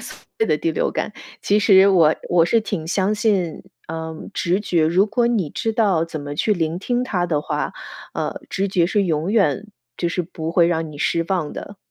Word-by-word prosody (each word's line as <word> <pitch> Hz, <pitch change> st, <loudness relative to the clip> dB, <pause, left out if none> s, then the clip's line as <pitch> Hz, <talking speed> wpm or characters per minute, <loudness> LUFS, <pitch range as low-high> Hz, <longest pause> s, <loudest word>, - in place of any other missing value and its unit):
所 -, -, -9 dB, 0.2 s
谓 445 Hz, -, +3 dB
的 -, -, +1 dB
第 335 Hz, -, 0 dB
六 -, -, 0 dB
感。 -, -, -3 dB, 0.3 s
其 205 Hz, -, +2 dB
实 200 Hz, -2 st, +6 dB
我 165 Hz, -5 st, +5 dB
我 175 Hz, -2 st, +4 dB
是 225 Hz, +7 st, +3 dB
挺 200 Hz, -7 st, -4 dB
相 195 Hz, +4 st, +1 dB
信 195 Hz, -7 st, 0 dB, 0.3 s
嗯 160 Hz, +1 st, -6 dB
直 185 Hz, +2 st, 0 dB
觉， 170 Hz, -6 st, +1 dB
如 185 Hz, +6 st, +3 dB
果 235 Hz, +3 st, +1 dB
你 215 Hz, -10 st, 0 dB
知 225 Hz, -, -2 dB
道 200 Hz, -8 st, +2 dB
怎 160 Hz, -2 st, -6 dB
么 145 Hz, 0 st, -6 dB
去 210 Hz, +8 st, +1 dB
聆 165 Hz, -2 st, -1 dB
听 245 Hz, +4 st, -1 dB
它 185 Hz, -8 st, -1 dB
的 155 Hz, -4 st, 0 dB
话， -, -, -3 dB, 0.4 s
呃， -, -, -3 dB
直 195 Hz, +1 st, -1 dB
觉 180 Hz, -3 st, +2 dB
是 200 Hz, +2 st, +1 dB
永 165 Hz, +3 st, -1 dB
远 195 Hz, -3 st, +2 dB, 0.3 s
就 170 Hz, -, -1 dB
是 175 Hz, +2 st, -1 dB
不 165 Hz, -1 st, -6 dB
会 170 Hz, -1 st, +4 dB
让 160 Hz, -2 st, -1 dB
你 145 Hz, -, -10 dB
失 165 Hz, +2 st, +1 dB
望 175 Hz, -6 st, -1 dB
的。 200 Hz, -, -8 dB
180 Hz, 225 characters per minute, -21 LUFS, 160-205 Hz, 0.4 s, 实